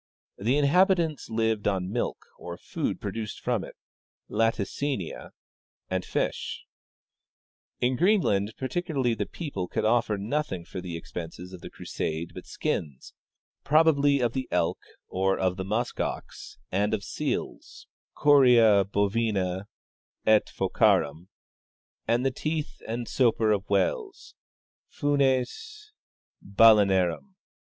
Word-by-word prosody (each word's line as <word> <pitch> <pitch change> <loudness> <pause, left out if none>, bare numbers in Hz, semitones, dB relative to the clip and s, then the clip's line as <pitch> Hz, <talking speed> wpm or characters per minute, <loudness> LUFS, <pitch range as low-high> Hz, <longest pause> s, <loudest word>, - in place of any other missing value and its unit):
The 120 +8 +1
inhabitants 165 +1 +2
lived 110 -2 0
on 95 -2 -1
milk, 120 - -3
or 85 0 -7
food - - -3
produced 110 -2 -5
from - - -1
it - - -10 0.6
(latimiia), 115 - -1 0.6
and 95 -1 0
fish. - - -3 1.1
In 125 +1 +1
Greenland 115 - +2
particularly 135 -3 -1
the - - -3
people 135 - -5
could - - -2
offer 110 -2 +2
nothing 100 - -2
for 90 +2 -7
the 85 -2 -5
expenses 85 +2 -8
of 90 - -9
the - - -8
crusade 80 +2 -4
but - - -10
skins, 70 -5 -4 0.5
probably 145 -2 +4
of 120 -1 +1
the 130 -1 -3
elk 85 -2 0 0.3
or 95 +1 0
of 95 -1 0
the 95 - -4
musk 110 +6 -2
ox - - -5
and 105 +3 +1
of 100 - -6
seals - - -4 0.3
{coria 120 -8 +6
bovina 100 -2 0 0.6
et 110 -1 +4
phocarum) 80 +5 +1 0.8
and 120 +2 +2
the 135 - +2
teeth 150 - -4
and 115 +1 -3
soper 115 -4 +2
of 100 -1 0
Avhales 100 -2 -1 0.6
{funes 145 - -1 0.7
halenarwii). 100 -6 +6
110 Hz, 115 wpm, -27 LUFS, 95-135 Hz, 1.1 s, coria